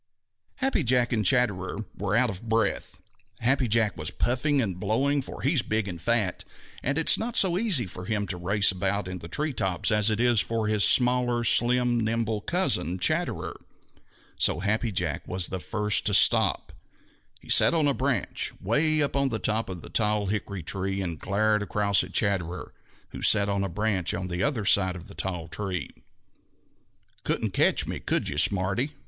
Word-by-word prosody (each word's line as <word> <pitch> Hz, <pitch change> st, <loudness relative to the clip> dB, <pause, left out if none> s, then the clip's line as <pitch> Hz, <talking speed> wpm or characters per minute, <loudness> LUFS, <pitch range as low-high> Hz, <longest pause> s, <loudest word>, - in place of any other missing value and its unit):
_ -, -, -59 dB, 0.5 s
Happy 265 Hz, -, 0 dB
Jack 125 Hz, -1 st, +2 dB
and 110 Hz, -2 st, 0 dB
Chatterer 100 Hz, -2 st, 0 dB
were 100 Hz, +1 st, -2 dB
out 120 Hz, -1 st, +2 dB
of 100 Hz, +4 st, -10 dB
breath. 115 Hz, 0 st, -1 dB, 0.4 s
Happy 130 Hz, +1 st, +1 dB
Jack 110 Hz, -4 st, +1 dB
was 75 Hz, -1 st, -4 dB
puffing 140 Hz, +4 st, 0 dB
and 95 Hz, -8 st, -2 dB
blowing, 135 Hz, +8 st, 0 dB
for -, -, -10 dB
he 140 Hz, +5 st, +2 dB
is 145 Hz, -, +3 dB
big 110 Hz, -2 st, -2 dB
and 85 Hz, -4 st, -7 dB
fat, 110 Hz, -5 st, 0 dB, 0.4 s
and 140 Hz, +3 st, -2 dB
it 160 Hz, -, -1 dB
is -, -, +6 dB
not 230 Hz, +1 st, -4 dB
so 185 Hz, -3 st, +3 dB
easy 185 Hz, -, +2 dB
for 90 Hz, 0 st, -9 dB
him 105 Hz, 0 st, -2 dB
to 95 Hz, -, -4 dB
race 100 Hz, +4 st, +2 dB
about 95 Hz, +1 st, -2 dB
in 90 Hz, 0 st, -6 dB
the 85 Hz, -, -9 dB
tree 150 Hz, -, -2 dB
tops 95 Hz, -2 st, -1 dB
as 105 Hz, 0 st, +3 dB
it 110 Hz, 0 st, -1 dB
is 120 Hz, -2 st, +3 dB
for 115 Hz, -1 st, -2 dB
his 105 Hz, -1 st, +2 dB
smaller, 125 Hz, -1 st, +3 dB
slim, 120 Hz, +1 st, +3 dB
nimble 110 Hz, -1 st, -1 dB
cousin, 95 Hz, -, 0 dB
Chatterer. 90 Hz, -, -1 dB, 0.8 s
So 85 Hz, -, +1 dB
Happy 110 Hz, +3 st, -1 dB
Jack 85 Hz, -6 st, -3 dB
was 90 Hz, -1 st, -2 dB
the 95 Hz, -, -4 dB
first 105 Hz, +5 st, 0 dB
to 100 Hz, -, +2 dB
stop. -, -, +3 dB, 0.7 s
He -, -, -19 dB
sat -, -, +5 dB
on 155 Hz, -3 st, +2 dB
a 140 Hz, -, +2 dB
branch 130 Hz, -6 st, -2 dB
'way 150 Hz, +8 st, +1 dB
up 140 Hz, -, -2 dB
in 140 Hz, -1 st, +1 dB
the 115 Hz, -, -2 dB
top 110 Hz, 0 st, -1 dB
of 90 Hz, -3 st, -7 dB
the -, -, -8 dB
tall 105 Hz, -2 st, 0 dB
hickory 100 Hz, -2 st, -4 dB
tree 95 Hz, +3 st, -3 dB
and 85 Hz, -4 st, -4 dB
glared 105 Hz, +1 st, 0 dB
across 100 Hz, 0 st, +1 dB
at -, -, -9 dB
Chatterer, 95 Hz, -4 st, -2 dB, 0.4 s
who -, -, -9 dB
sat 100 Hz, -1 st, +3 dB
on 100 Hz, 0 st, -1 dB
a 100 Hz, -, -3 dB
branch 95 Hz, -1 st, -1 dB
on 90 Hz, 0 st, -5 dB
the 90 Hz, +1 st, -3 dB
other 130 Hz, -8 st, -1 dB
side 95 Hz, -2 st, +3 dB
of 90 Hz, -1 st, -10 dB
the -, -, -12 dB
tall 90 Hz, -3 st, -4 dB
tree. 90 Hz, +2 st, -5 dB, 1.3 s
"Couldn't -, -, -1 dB
catch -, -, +3 dB
me, -, -, -5 dB
could -, -, -1 dB
you, 75 Hz, -, -1 dB
smarty?" 100 Hz, -, +2 dB
105 Hz, 190 wpm, -26 LUFS, 95-125 Hz, 1.3 s, is